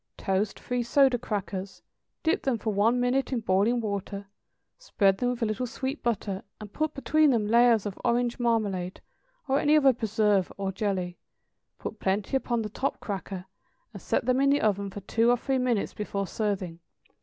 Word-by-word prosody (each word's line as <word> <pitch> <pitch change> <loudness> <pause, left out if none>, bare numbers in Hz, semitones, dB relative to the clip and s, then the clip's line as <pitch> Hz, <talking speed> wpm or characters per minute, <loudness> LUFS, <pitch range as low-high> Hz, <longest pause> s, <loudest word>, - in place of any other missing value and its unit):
= - - -54
Toast 195 +1 -1
three 245 0 -2
soda 260 +1 +3
crackers, 200 -4 -4 0.4
dip 335 +6 +2
them 260 -4 0
for 220 0 -2
one 225 +5 +3
minute 250 +3 +1
in 250 -3 -1
boiling 215 +4 +2
water, 200 -1 -4 0.5
spread 195 - +2
them 245 - +1
with 245 -1 -2
a - - +3
little 215 +3 -2
sweet 265 +5 -4
butter, 205 -4 -2 0.2
and 210 -2 -10
put 310 0 -1
between 300 +3 +3
them 230 -5 +2
layers 230 -1 +4
of 200 -2 -5
orange 240 +1 +1
marmalade, 205 -6 0 0.5
or 270 +1 +2
any 300 +1 +4
other 275 -3 +5
preserve 210 -4 +1
or 195 -1 -2
jelly; 185 -3 -2 0.6
put 220 - -7
plenty 195 +6 -1
upon 240 -3 0
the - - -3
top 265 +6 -2
cracker, 190 -2 -5 0.5
and - - -9
set - - 0
them 255 +1 +2
in 275 - +4
the 285 +1 +3
oven 200 -2 +1
for 200 +1 -8
two 225 +4 +2
or 245 - +4
three 265 +2 -1
minutes 245 -5 0
before 200 -1 -3
serving. 190 -4 -3
225 Hz, 185 wpm, -27 LUFS, 200-250 Hz, 0.6 s, other